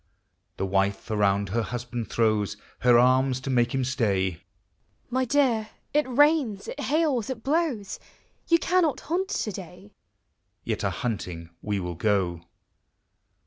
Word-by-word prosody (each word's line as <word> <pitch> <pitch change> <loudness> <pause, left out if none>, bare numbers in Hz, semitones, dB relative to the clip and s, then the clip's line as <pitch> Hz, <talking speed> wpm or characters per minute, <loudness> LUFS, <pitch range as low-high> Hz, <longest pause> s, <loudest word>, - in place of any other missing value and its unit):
The - - -1
wife 100 +3 0
around 100 -2 +2
her 115 +4 0
husband 120 0 -5
throws 110 -3 +1 0.2
Her 120 0 +5
arms 130 +1 +4
to 135 - -3
make 120 -1 +2
him 135 - +1
stay; 100 - 0 0.7
"My 260 +1 +1
dear, 235 -5 +2 0.2
it 300 -2 +2
rains, 270 -6 +3
it 290 - -6
hails, 285 -5 +1
it 235 -4 -5
blows; 275 - -1 0.5
You 335 - +5
cannot 340 -3 +1
hunt 370 +5 -1
to 215 - -2
day/' 185 +1 -10 0.7
Yet - - -2
a - - +2
hunting 90 -8 -4
we 105 -1 -1
will 90 -1 -4
go. 90 -2 0
130 Hz, 140 wpm, -26 LUFS, -, 0.7 s, Her